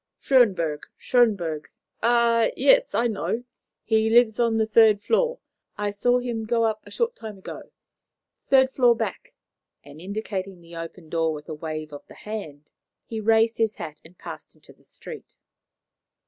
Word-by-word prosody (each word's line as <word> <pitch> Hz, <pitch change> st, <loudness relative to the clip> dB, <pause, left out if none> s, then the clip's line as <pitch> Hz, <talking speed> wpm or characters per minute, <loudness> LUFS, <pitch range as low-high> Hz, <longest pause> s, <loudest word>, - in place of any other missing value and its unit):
"Schönberg 185 Hz, -, +2 dB
Schönberg? 195 Hz, -11 st, +1 dB, 0.4 s
Ah, 235 Hz, -1 st, +3 dB
yes! -, -, +4 dB
I 235 Hz, -, +2 dB
know. 230 Hz, +1 st, -2 dB, 0.4 s
He 220 Hz, -1 st, +2 dB
lives 230 Hz, -1 st, +4 dB
on 230 Hz, -2 st, +2 dB
the 220 Hz, -, +2 dB
third 220 Hz, -1 st, +5 dB
floor. 480 Hz, -, +1 dB, 0.4 s
I 205 Hz, 0 st, -1 dB
saw 245 Hz, +5 st, +2 dB
him 240 Hz, -3 st, -3 dB
go 230 Hz, +1 st, +1 dB
up 220 Hz, -1 st, 0 dB
a -, -, -14 dB
short 475 Hz, +1 st, -1 dB
time 215 Hz, -, -8 dB
ago. 190 Hz, -, -10 dB, 0.8 s
Third 265 Hz, -1 st, +5 dB
floor 245 Hz, -3 st, +4 dB
back;" 225 Hz, -5 st, -5 dB, 0.5 s
and 145 Hz, +2 st, -13 dB
indicating 195 Hz, -1 st, -5 dB
the 170 Hz, 0 st, -14 dB
open 165 Hz, 0 st, -8 dB
door 165 Hz, -1 st, 0 dB
with 150 Hz, 0 st, -10 dB
a -, -, -4 dB
wave 155 Hz, -1 st, -6 dB
of 145 Hz, -, -9 dB
the -, -, -14 dB
hand, 160 Hz, -9 st, -8 dB, 0.4 s
he 225 Hz, -1 st, -5 dB
raised 225 Hz, +1 st, +3 dB
his 220 Hz, -1 st, +1 dB
hat 155 Hz, -1 st, -8 dB
and 170 Hz, +2 st, -17 dB
passed -, -, -10 dB
into -, -, -19 dB
the -, -, -29 dB
street. 465 Hz, -, -11 dB
220 Hz, 160 wpm, -24 LUFS, 170-235 Hz, 0.8 s, third